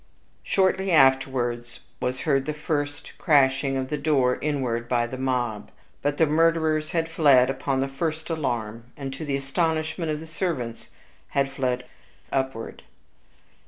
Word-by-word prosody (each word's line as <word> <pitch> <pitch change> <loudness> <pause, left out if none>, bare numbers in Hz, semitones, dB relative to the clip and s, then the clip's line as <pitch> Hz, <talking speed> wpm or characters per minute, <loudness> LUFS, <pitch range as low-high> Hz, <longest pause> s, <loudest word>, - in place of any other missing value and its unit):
Shortly 190 0 +1
afterwards 130 -4 +2 0.2
was 125 +1 -2
heard 135 -3 +1
the 155 - -2
first 145 -1 -3
crashing 135 -3 +3
of 130 0 -3
the 150 - -2
door 135 -4 +2
inward 125 -6 -1
by 120 -1 +2
the 120 - -6
mob; 125 -5 -2 0.3
but 145 0 0
the 160 - +5
murderers 160 0 +2
had 165 -1 0
fled 140 -6 +5
upon 135 -1 -1
the 135 - 0
first 155 +3 -3
alarm, 115 -7 -2
and, 135 -2 -5
to 135 - -6
the 145 -2 -1
astonishment 155 +4 -1
of 150 -1 -1
the 160 - -8
servants, 155 -9 -4 0.4
had 140 -1 0
fled 125 -2 -1 0.5
upward. 130 -4 -3
135 Hz, 145 wpm, -25 LUFS, 130-155 Hz, 0.5 s, the